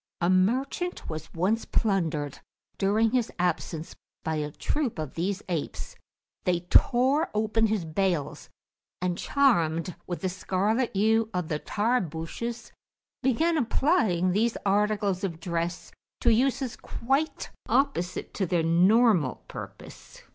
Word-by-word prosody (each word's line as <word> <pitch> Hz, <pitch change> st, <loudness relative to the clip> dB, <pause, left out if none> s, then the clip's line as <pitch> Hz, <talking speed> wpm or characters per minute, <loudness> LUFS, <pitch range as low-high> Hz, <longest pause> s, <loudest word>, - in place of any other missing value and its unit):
A 175 Hz, +1 st, +2 dB
merchant 260 Hz, -, 0 dB
was 155 Hz, 0 st, -6 dB
once 200 Hz, +7 st, +1 dB
plundered 165 Hz, -9 st, 0 dB, 0.4 s
during 215 Hz, +3 st, +2 dB
his 245 Hz, -2 st, +1 dB
absence 170 Hz, -2 st, -2 dB, 0.3 s
by 160 Hz, -1 st, -1 dB
a 150 Hz, -1 st, -2 dB
troop 265 Hz, -, -2 dB
of 155 Hz, -3 st, -4 dB
these 190 Hz, +4 st, -2 dB
apes; 170 Hz, -5 st, -4 dB, 0.5 s
they 175 Hz, -1 st, +1 dB
tore 260 Hz, -, +3 dB
open 220 Hz, +1 st, +2 dB
his 210 Hz, -5 st, -1 dB
bales, 165 Hz, -2 st, -1 dB, 0.5 s
and, 180 Hz, -1 st, -1 dB
charmed 175 Hz, -, +2 dB
with 175 Hz, -, -4 dB
the 190 Hz, -, 0 dB
scarlet 200 Hz, +6 st, 0 dB
hue 220 Hz, +2 st, +3 dB
of 180 Hz, -3 st, -2 dB
the 150 Hz, -, -1 dB
Tarbushes, 225 Hz, +2 st, -2 dB, 0.5 s
began 315 Hz, +6 st, +2 dB
applying 225 Hz, -, +2 dB
those 220 Hz, +5 st, +1 dB
articles 205 Hz, -1 st, +1 dB
of 170 Hz, -4 st, -3 dB
dress 170 Hz, 0 st, -3 dB, 0.3 s
to 235 Hz, -, +5 dB
uses 260 Hz, +1 st, +1 dB
quite 270 Hz, +6 st, -2 dB, 0.2 s
opposite 225 Hz, -11 st, 0 dB
to 190 Hz, -, -1 dB
their 170 Hz, -1 st, +1 dB
normal 180 Hz, -, +4 dB
purpose. -, -, -10 dB
195 Hz, 125 wpm, -27 LUFS, 170-235 Hz, 0.5 s, to